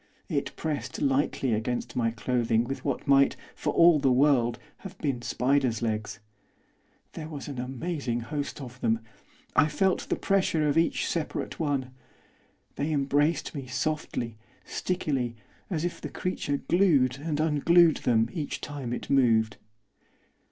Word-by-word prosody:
It - - -2
pressed 140 -5 -3
lightly 135 -2 +1
against 115 +3 -2
my 115 -2 +2
clothing 115 -1 +1
with 135 +3 -5
what 140 -3 -2
might, 140 0 +5 0.2
for - - -2
all 170 -2 +6
the 135 -2 +3
world, 125 -3 +3 0.2
have 195 -1 -10
been 135 -8 -2
spider's 125 0 +1
legs. 110 -1 -2 0.9
There 155 -1 -6
was 145 -3 -7
an 140 -4 -5
amazing 130 -1 -3
host 145 +6 -4
of 125 -1 -10
them, 115 0 +1 0.5
I 150 - +5
felt 190 +4 0
the - - +2
pressure 185 -6 +1
of 145 - +1
each 165 +1 +2
separate 165 -3 -3
one. 140 -5 -1 0.9
They 145 +3 -1
embraced 145 +2 +1
me 140 -4 -6
softly, 125 -4 -3 0.3
stickily, 135 -10 -2 0.3
as 170 -3 -1
if 175 - -4
the - - -5
creature 145 -6 -2
glued 140 -6 +3
and 150 0 -2
unglued 160 +2 +4
them, 115 -2 +2
each 150 -4 -3
time 140 -5 -5
it - - -5
moved. 115 -5 +3
140 Hz, 145 wpm, -28 LUFS, 125-155 Hz, 0.9 s, all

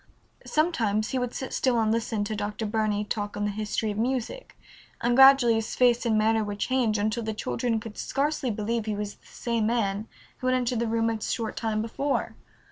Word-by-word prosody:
Sometimes 230 -10 +1
he 260 - 0
would 250 -1 -2
sit 265 - -5
still 250 -3 +2
and 220 -1 +2
listen 225 -2 -1
to 215 +1 -3
Dr. 210 +2 -3
Burney 210 -1 0
talk 205 -1 -3
on 205 - -1
the 205 - 0
history 215 +1 -2
of 205 - -4
music, 260 - -3 0.4
and 240 0 +1
gradually 270 -3 +7
his 225 0 -2
face 245 -1 +3
and 220 -1 +3
manner 220 +1 +3
would 205 -1 -4
change 240 -2 +1
until 215 +3 0
the 220 -1 -3
children 230 +1 -1
could 215 -1 -9
scarcely 280 -1 -1
believe 220 +1 -2
he 215 - -1
was 205 0 -4
the - - -24
same 230 -2 -1
man 215 -2 0 0.3
who 255 - -2
had 255 - +3
entered 245 -2 0
the 235 - 0
room 225 0 +1
a 220 -1 -4
short 225 +1 -2
time 220 -1 -1
before. 275 +5 -2
225 Hz, 210 wpm, -27 LUFS, 215-245 Hz, 0.4 s, gradually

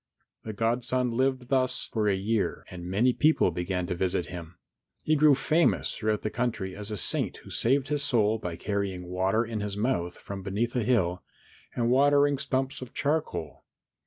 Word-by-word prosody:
The 110 - -6
godson 120 +3 0
lived 130 +1 0
thus 130 -2 +1
for 110 -2 +1
a 100 - +3
year 105 +2 -1
and 90 -1 -7
many 115 +7 +3
people 155 - +3
began 90 +1 -2
to 90 - -2
visit 90 0 -1
him. 85 -1 -9 0.5
He 155 - +2
grew 150 -1 +6
famous 155 +5 +2
throughout 110 -1 -1
the 110 - -2
country 115 -6 -2
as 105 +1 -5
a 105 - -3
saint - - +1
who - - -12
saved 135 +3 +1
his 145 -1 +1
soul 110 -5 +2
by 90 -5 -4
carrying 100 0 -3
water 95 +5 0
in 115 -1 -4
his 105 -1 -4
mouth 105 -7 -1
from 100 -1 -7
beneath 105 +6 -2
a 125 - +2
hill, 95 -7 +1 0.5
and 120 0 +1
watering 145 +1 +4
stumps 135 -1 -2
of 130 - -9
charcoal. 145 - -2
110 Hz, 180 wpm, -28 LUFS, 95-130 Hz, 0.5 s, grew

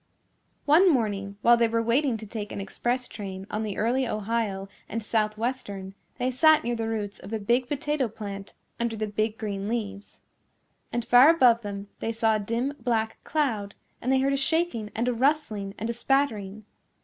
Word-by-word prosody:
One 330 +6 +6
morning 200 -6 -1
while 240 0 +7
they 235 0 +3
were 230 0 0
waiting 240 +1 +2
to 220 - -9
take 210 -1 -6
an - - -5
express 240 +6 -2
train 195 -2 -7
on 215 - -1
the 210 -3 -3
Early 250 +4 +1
Ohio 210 -3 -2 0.2
& 225 - -3
Southwestern 215 -2 -2 0.2
they 250 +1 0
sat 315 +4 +5
near 240 +1 -1
the 225 -1 -2
roots 210 -2 -3
of 195 - -10
a 225 - 0
big 240 +4 +1
potato 290 -1 -1
plant 200 -2 -8 0.2
under 235 -1 -1
the 215 0 -2
big 215 +1 -1
green 200 -2 -4
leaves. 210 -3 -4 0.7
And 240 -1 -2
far 245 +4 +8
above 250 -8 +5
them 200 -1 -6
they 225 - -2
saw 225 -1 +2
a - - -4
dim 230 +7 -1
black 225 -2 -1
cloud 225 -10 -1 0.3
and 255 - 0
they 265 - +4
heard 275 +1 +2
a - - +1
shaking 275 -6 0
and 235 +2 0
a 250 - +2
rustling 230 -7 0
and 225 - -3
a 235 - -1
spattering. 220 -5 0
225 Hz, 185 wpm, -26 LUFS, 210-250 Hz, 0.7 s, far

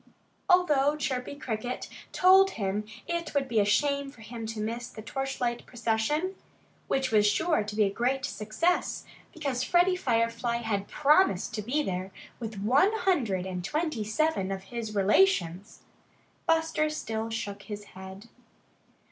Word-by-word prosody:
Although 300 -6 +4
Chirpy 270 -2 -3
Cricket 245 -2 -4 0.2
told 380 +1 +6
him 205 0 -1 0.2
it 340 -2 -3
would 275 -1 +1
be 230 -4 +1
a 205 - +4
shame 280 +6 +1
for 275 -5 -15
him 225 0 -7
to 225 0 -5
miss 230 +3 -3
the 215 - -10
torchlight 250 -1 -2
procession, 245 - 0 0.5
which 265 -1 0
was 210 -1 +5
sure 320 +8 +2
to 210 0 -6
be 215 - +4
a 195 - +1
great 255 +5 0
success, 215 - -1 0.3
because 280 -6 -2
Freddie 355 +1 +3
Firefly 235 -5 0
had 215 -4 -2
promised 300 - +3
to 210 - -2
be 265 +8 0
there 185 -2 -3 0.3
with 225 -3 -6
one 275 - +4
hundred 280 - +1
and 180 -1 -4
twenty 300 - -1
seven 215 -3 0
of 190 0 -4
his 225 -3 -4
relations, 195 - +2 0.6
Buster 320 -1 +2
still 225 -7 -3
shook 205 -3 -4
his 205 0 -7
head. 190 +3 -10
235 Hz, 150 wpm, -28 LUFS, 210-300 Hz, 0.6 s, told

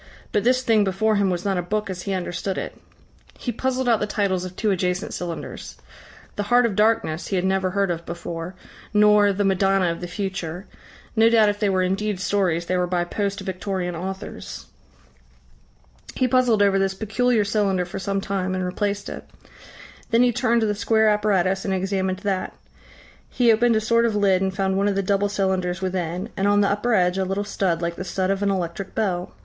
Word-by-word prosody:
But 205 - +1
this 255 +2 +3
thing 225 -4 +3
before 205 +3 +1
him 200 -1 +2
was 180 0 -2
not 195 -2 +1
a - - 0
book 210 +4 -2
as 185 -2 -5
he 195 +1 -3
understood 185 +1 -3
it. - - -5 0.6
He 245 - -3
puzzled 260 +2 -1
out 230 -3 +4
the 210 - -1
titles 195 -4 0
of 185 0 -7
two 215 0 0
adjacent 180 0 -1
cylinders. 175 -2 -6 0.6
"The - - 0
Heart 245 0 +5
of 220 -4 -1
Darkness" 210 -6 +1
he 195 - -2
had 180 0 0
never 190 0 +1
heard 195 0 0
of 170 -1 -4
before 170 +1 -6 0.4
nor 210 -1 +5
"The 200 +1 -1
Madonna 195 -2 +2
of 170 - -6
the 175 - -4
Future" 185 -1 -4 0.5
no 225 0 +5
doubt 220 -2 +5
if 205 0 -3
they 210 - +1
were 185 -1 +2
indeed 195 +1 -1
stories, 185 -4 0
they 185 +1 0
were 180 0 +1
by 175 -1 0
post 200 +2 -3
Victorian 185 -2 -3
authors. 190 +3 -6 1.5
He 255 - +2
puzzled 245 -4 +3
over 195 -1 +3
this 195 0 0
peculiar 220 +1 +1
cylinder 200 -3 +1
for 180 +2 -6
some 195 0 -2
time 190 -1 -2
and 185 -1 -2
replaced 200 +2 -2
it. - - -7 0.8
Then 230 +1 +4
he 250 - +4
turned 235 0 +2
to - - +2
the 210 - +1
square 220 +1 +2
apparatus 195 -3 +1
and 195 -2 -1
examined 190 0 -1
that. 195 -2 -2 0.7
He 240 -2 +3
opened 235 +1 +3
a - - +3
sort 230 +2 +2
of 225 -2 0
lid 195 -3 +3
and 190 0 0
found 190 0 -1
one 200 +1 +2
of 200 - 0
the 195 - 0
double 200 +1 +1
cylinders 190 -3 -1
within, 185 +1 -3
and 195 +1 0
on 205 0 +4
the 200 - +3
upper 215 +3 +1
edge 180 -1 +2
a - - +2
little 195 +2 -2
stud 190 -4 -1
like 170 0 -2
the - - -4
stud 190 +1 -1
of 195 0 -1
an 200 - +1
electric 185 0 -3
bell. 180 -4 -1
195 Hz, 210 wpm, -23 LUFS, 185-210 Hz, 1.5 s, Heart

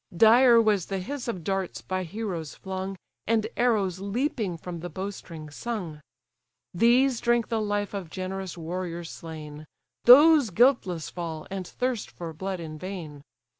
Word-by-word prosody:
Dire 235 +3 +7
was 210 -5 +2
the 195 - -2
hiss 255 +8 -5
of 185 -8 -3
darts, 195 0 -2
by 185 0 -2
heroes 180 -4 -5
flung, 190 0 -5 0.3
And 225 -1 +2
arrows 205 -7 +1
leaping 205 - -2
from 170 0 -7
the 175 +2 -6
bow 195 +2 -4
string 160 -6 -10
sung; 175 -5 -5 0.7
These 240 +5 +4
drink 240 -1 +2
the 225 -1 0
life 205 -1 -1
of 195 -5 -5
generous 185 0 -5
warriors 170 0 -5
slain: 155 -2 -9 0.4
Those 290 +1 +8
guiltless 190 - +2
fall, 165 -3 -5
and 190 -2 -4
thirst 250 -3 -2
for 165 -2 -7
blood 190 +3 -4
in 155 -2 -7
vain. 165 -5 -7
190 Hz, 150 wpm, -27 LUFS, 170-230 Hz, 0.7 s, Those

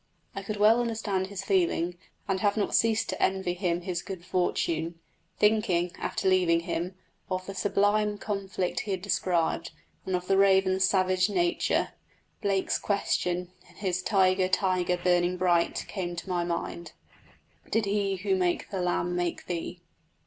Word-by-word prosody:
I 195 - -3
could 210 +2 -4
well 220 +3 +5
understand 215 -5 -1
his 200 -1 -6
feeling, 175 -2 +1 0.3
and 190 -1 0
have 205 +1 +1
not 210 - 0
ceased 225 -1 +3
to - - -3
envy 190 -2 +1
him 175 -1 -1
his 175 -1 -3
good 185 -3 -8
fortune. 170 -2 -1 0.4
Thinking, 200 -5 +2
after - - -2
leaving 180 -3 +3
him, 175 +1 -3 0.3
of 185 0 -2
the 195 - -6
sublime 205 +1 +1
conflict 195 -3 -2
he 210 - -6
had 185 -1 -4
described, 170 -4 0 0.4
and 190 - +1
of 180 0 -3
the 195 +1 +2
raven's 190 -1 +4
savage 185 0 +2
nature, 345 - +1 0.5
Blake's 195 -2 +1
question 180 -3 -1 0.2
in - - -20
his 185 -3 -1
"Tiger, 185 -1 +3
tiger, 185 -2 +1
burning 175 0 +2
bright" 175 -2 +1
came 175 -3 -4
to 170 0 -7
my 175 -1 0
mind: 170 0 -4 0.8
Did 225 -1 +1
He 200 -1 0
who 190 +1 0
made 180 -2 0
the 190 -2 -2
lamb 175 0 0
make 175 -1 -2
thee? 175 0 -4
185 Hz, 155 wpm, -28 LUFS, 175-200 Hz, 0.8 s, well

